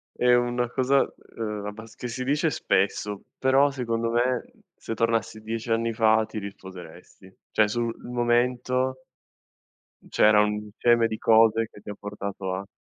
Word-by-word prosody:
è 125 0 +3
una 120 0 0
cosa 135 +2 +2 0.4
ehm, 105 -2 -4
abbas 110 +2 -9
che 125 - -6
si 130 +2 -4
dice 150 +4 +1
spesso, 100 -4 0 0.2
però 135 +2 +4
secondo 115 -3 -2
me, 125 +1 0 0.2
se 115 - -6
tornassi 115 -1 0
10 115 +1 -4
anni 115 0 +1
fa, 110 0 +3
ti 110 - -8
risposeresti, 95 -2 -10 0.2
cioè, 110 -1 +3
sul 115 +1 -2
momento, 125 +2 0 1.0
m - - -17
c'era 105 0 +5
un 105 - +1
insieme 115 +2 +2
di 110 - -3
cose, 115 0 +4
che - - -14
ti 105 - -14
ha - - -5
portato 100 -2 -5
a 100 +1 -5
115 Hz, 155 wpm, -25 LUFS, 105-120 Hz, 1.0 s, c'era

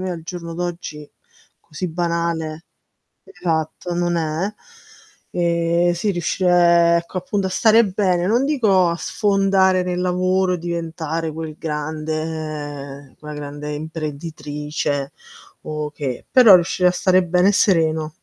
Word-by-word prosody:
me 185 0 -3
al 170 -2 -5
giorno 170 0 -7
d'oggi 170 -4 -5 0.5
così 155 +4 -6
banale, 170 -1 -2 0.6
esatto, 165 - -3
non 175 0 0
è, 165 +5 -2 0.8
ehm, 170 0 +1
sì, 175 +5 -1
riuscire 175 -1 +3
ecco 175 +2 -6
appunto 190 +1 -2
a - - -8
stare 225 +4 +5
bene, 185 -3 0
non 235 +6 +2
dico 210 - +3
a 170 - -1
sfondare 195 -1 +2
nel 180 0 -2
lavoro, 185 +1 +1
diventare 165 -1 -3
quel 160 -1 -6
grande 150 -3 -5
quella 150 0 -8
grande 145 0 -6
imprenditrice 150 -2 -4 0.5
o 150 -1 -4
che, 140 -4 -5
però 240 -6 +8
riuscire 180 +1 +3
a - - +1
stare 185 0 +3
bene 180 +2 +3
e - - +4
sereno. 160 -6 +2
170 Hz, 125 wpm, -20 LUFS, 155-185 Hz, 0.8 s, però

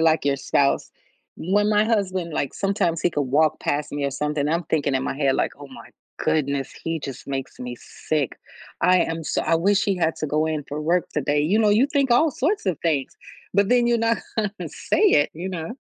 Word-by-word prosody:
like, 160 -2 +3
your 140 -1 +2
spouse, 140 +1 +1 0.5
when 205 +4 +1
my 210 0 +4
husband, 190 -6 -1
like, 140 - -1
sometimes 195 -5 0
he 175 - +2
could 145 - -1
walk 145 +4 +2
past 145 +1 -1
me 145 -1 -2
or 140 - 0
something, 150 +1 -1
I'm 165 +1 0
thinking 145 -4 0
in 130 - +1
my - - -3
head 140 -2 +2
like, - - 0
“Oh, 145 - -9
my 130 - -12 0.3
goodness, 140 -3 0
he 165 -1 -2
just 135 -2 -7
makes 135 -1 -5
me 125 -1 -5 0.3
sick. 150 -5 0 0.4
I 180 0 +5
am 165 -1 -1
so - - -1
I - - +2
wish 195 +5 +2
he 200 -2 0
had 165 -2 +1
to 155 - -3
go 155 +2 +1
in 155 -2 -2
for 150 +2 -4
work 170 +3 +1
today,” 145 0 0
you 185 +9 +2
know, 215 -2 +4
you 225 +6 +4
think 280 -3 0
all 300 +6 +4
sorts 310 - -1
of 175 -5 0
things, 150 -5 -1 0.4
but 200 0 +3
then 245 -1 +4
you're 235 -1 +2
not 230 0 +1 0.2
gonna 215 -1 -2
say - - -2
it, 380 - +4
you 175 +4 -5
know. 170 +4 -5
165 Hz, 225 wpm, -23 LUFS, 145-200 Hz, 0.5 s, I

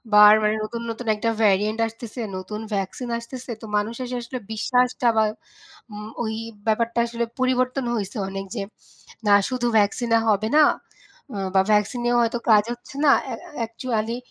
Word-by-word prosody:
বারবার 210 +1 +9
মানে 210 +1 +2
নতুন, 230 +2 -5
নতুন 230 +1 -7
একটা 220 +2 -1
ভ্যারিয়োন্ট 210 +1 +2
আসতেছে 225 +1 -8 0.2
নতুন 200 +3 -6 0.2
ভ্যাকসিন 200 +6 -4
আসতেছে 245 +1 -8
তো - - -8
মানুষ 210 +3 -2
এসে 250 0 -4
আসলে 245 +2 -6
বিশ্বাসটা 250 +2 +1
বা 220 - +5 0.7
উম 210 +1 -7 0.2
ওই 220 0 -2 0.3
ব্যাপারটা 230 +2 +1
আসলে 235 0 -2 0.2
পরিবর্তন 255 +1 +1
হইছে 210 +1 -4
অনেক 195 0 -5
যে 205 - -2 0.7
না 205 - +7 0.2
শুধু 250 -1 -1
ভ্যাকসিন 215 +4 +1
এ - - +1
হবে 215 +1 +1
না। 310 - +8 0.7
অ্যা 200 - -3
বা 190 - +6
ভ্যাকসিন 210 +4 +1
এও 240 - +3
হয়তো 235 +1 0
কাজ 210 -1 +6
হচ্ছে 245 +2 -11
না। 280 - +7
অ্যা - - -4
অ্যা - - -13
অ্যাকচুয়ালি 230 0 -2
225 Hz, 170 wpm, -23 LUFS, 210-245 Hz, 0.7 s, বারবার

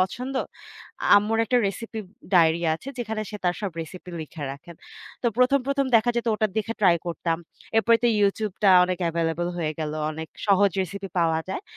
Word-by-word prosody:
পছন্দ। 250 +8 -2 0.8
আম্মুর 215 +2 +2
একটা 250 +3 +1
রেসিপি 225 +3 -5 0.3
ডায়রি 170 -1 +4
আছে 215 - -9
যেখানে 220 -2 -3
সে 210 - -5
তার 175 0 +2
সব 200 -3 -2
রেসিপি 180 +3 -9
লিখে 155 0 -8
রাখেন। 150 +5 -12 0.5
তো - - +1
প্রথম, 255 +3 +4
প্রথম 275 -1 +1
দেখা 235 +2 +3
যেত 235 - -1
ওটা 215 0 +1
দেখে 220 +1 -1
ট্রাই 180 -4 +5
করতাম। 165 -1 -2 0.4
এরপরে 230 +1 +5
তো - - +5
YouTube-টা 200 -1 +2
অনেক 180 0 -2
এভেইলেবল 165 +1 -1
হয়ে 155 -2 -1
গেল। 155 -1 -3 0.2
অনেক 160 +1 -6 0.2
সহজ 200 0 +4
রেসিপি 195 +2 -6
পাওয়া 165 -1 +2
যায়। 195 - -4
195 Hz, 175 wpm, -25 LUFS, 170-225 Hz, 0.8 s, ট্রাই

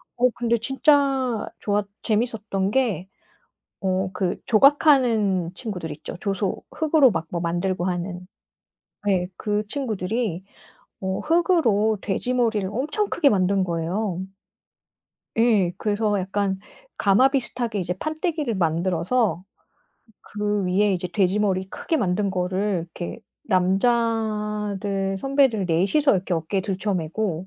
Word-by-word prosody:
어 250 +1 +3
근데 235 -1 +1
진짜 270 -1 +2
좋았 205 0 0 0.2
재밌었던 215 -3 0
게 215 -8 0 0.7
어 185 0 0
그 185 -1 -2
조각하는 230 - +4
친구들 180 -9 -5
있죠 - - -7
조소 195 -1 -2
흙으로 310 -4 +4
막 165 -2 -3
뭐 170 - -2
만들고 175 +2 -1
하는. 180 0 -3 0.8
네. 190 -3 +1
그 210 0 -1
친구들이 215 - -2 0.6
어 190 0 -2
흙으로 290 - +2
돼지 215 +5 -2
머리를 225 -6 +1
엄청 305 - -1
크게 305 -5 +4
만든 195 -3 +2
거예요. 175 +3 -2 1.2
예 220 -6 +3
그래서 210 -1 0
약간 195 +1 -1 0.4
가마 205 +7 +5
비슷하게 240 -5 -2
이제 180 0 -2
판때기를 310 - -2
만들어서 180 +4 0 0.8
그 210 -1 -2
위에 200 +3 +2
이제 180 -1 -2
돼지 185 +3 +1
머리 190 -2 0
크게 325 - -2
만든 200 -4 0
거를 185 0 -1
이렇게 175 +5 -7 0.2
남자들 210 -1 0
선배들 270 -6 +2
4 165 0 +2
이서 300 -2 +5
이렇게 185 -1 -1
어깨에 165 +4 -1
들쳐메고 190 -2 -2
205 Hz, 255 characters per minute, -23 LUFS, 185-235 Hz, 1.2 s, 가마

